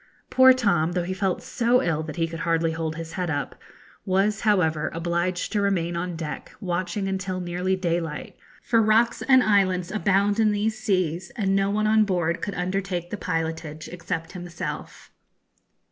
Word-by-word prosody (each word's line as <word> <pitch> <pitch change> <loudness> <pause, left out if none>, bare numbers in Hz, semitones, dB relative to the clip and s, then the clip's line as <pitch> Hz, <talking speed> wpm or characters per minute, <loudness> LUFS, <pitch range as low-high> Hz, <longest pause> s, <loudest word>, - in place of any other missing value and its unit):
Poor 260 0 +8
Tom, 200 -10 +2
though 180 -1 0
he 185 +2 -3
felt 190 -1 -1
so 245 +1 +2
ill 160 -2 0
that 155 -1 -6
he 165 -1 0
could 165 0 -7
hardly 165 -1 +1
hold 160 -1 -3
his 165 0 -7
head 180 -2 -2
up, 145 -4 -2 0.5
was, 195 +2 +1
however, 160 -8 +2
obliged 175 +2 -1
to 210 - +1
remain 175 -4 0
on 175 0 -3
deck 160 -2 -6
watching 185 +2 -2
until 190 -1 -2
nearly 180 +1 -1
daylight; 170 -4 -3 0.3
for 230 -1 +3
rocks 220 +2 +3
and 260 -2 +5
islands 185 -4 +2
abound 205 0 +2
in 215 -1 +4
these 210 +1 0
seas, 185 -5 -1
and 195 -5 +1
no 195 0 +2
one 215 +1 0
on 215 0 +4
board 175 -4 0
could 200 - -3
undertake 180 -1 -2
the - - -2
pilotage 160 -4 -3
except 165 -2 -5
himself. 175 -2 -7
180 Hz, 170 wpm, -25 LUFS, 165-200 Hz, 0.5 s, Poor